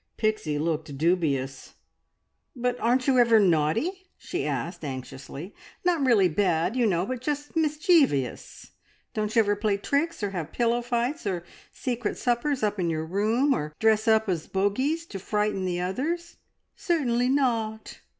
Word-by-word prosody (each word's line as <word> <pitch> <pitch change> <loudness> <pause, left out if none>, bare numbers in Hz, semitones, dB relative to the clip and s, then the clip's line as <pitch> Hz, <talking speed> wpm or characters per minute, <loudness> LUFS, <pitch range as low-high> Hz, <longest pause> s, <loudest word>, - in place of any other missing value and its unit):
Pixie 215 -9 0
looked 155 -2 -2
dubious. 140 -5 0 0.8
"But 245 0 -1
aren't 250 +2 +2
you 265 -2 +4
ever 230 -2 +6
naughty?" 210 - +1
she - - -4
asked - - -3
anxiously. 135 +5 -7 0.3
"Not 345 -5 +2
really 225 -8 +5
bad, 175 +2 +1
you 245 -3 +3
know, 180 -2 +1
but 255 +1 -4
just 290 +2 -3
mischeevious! 300 - +1 0.4
Don't 215 +1 -2
you 230 - +7
ever 205 -1 +1
play 205 -1 0
tricks, 285 +6 -1
or 200 - -1
have 175 -6 -4
pillow 240 0 +1
fights, 240 +3 -2
or 180 -3 -2 0.3
secret 240 -4 -3
suppers 250 +2 0
up 210 -1 0
in 175 -2 +1
your 160 -1 -2
room, 220 - +2
or 150 - -4
dress 220 +1 +2
up 220 -1 +4
as 175 -5 -2
bogeys 260 +12 0
to 200 -12 -7
frighten 210 -1 -1
the 175 -1 -1
others?" 300 - -3 0.4
"Certainly 255 -9 +1
not!" 230 -5 -1
215 Hz, 150 wpm, -26 LUFS, 180-255 Hz, 0.8 s, you